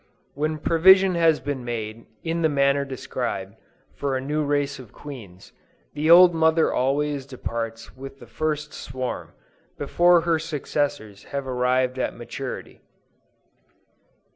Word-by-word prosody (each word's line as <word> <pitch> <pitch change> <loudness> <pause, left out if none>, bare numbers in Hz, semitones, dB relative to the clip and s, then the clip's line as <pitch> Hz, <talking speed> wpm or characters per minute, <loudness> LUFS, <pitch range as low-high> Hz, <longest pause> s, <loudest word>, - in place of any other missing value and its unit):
When 155 +2 -2
provision 185 +4 +5
has 165 -2 +3
been 140 -3 -4
made, 115 -1 -5 0.2
in 165 0 -2
the 160 - +3
manner 140 -1 +2
described, 120 -7 -4 0.4
for 140 -2 -2
a - - -2
new 150 +3 -1
race 145 -1 -1
of 125 -5 -12
queens, 115 -11 -11 0.4
the 150 +2 -1
old 175 +1 +9
mother 160 0 +3
always 140 +2 0
departs 115 -3 -6
with 135 +1 -10
the - - -13
first 150 -1 -3
swarm, 130 0 -5 0.4
before 175 0 +4
her 165 -1 +1
successors 145 -8 -3
have 140 -1 -4
arrived 125 0 0
at - - -2
maturity. - - -7
140 Hz, 130 wpm, -24 LUFS, 125-155 Hz, 0.4 s, old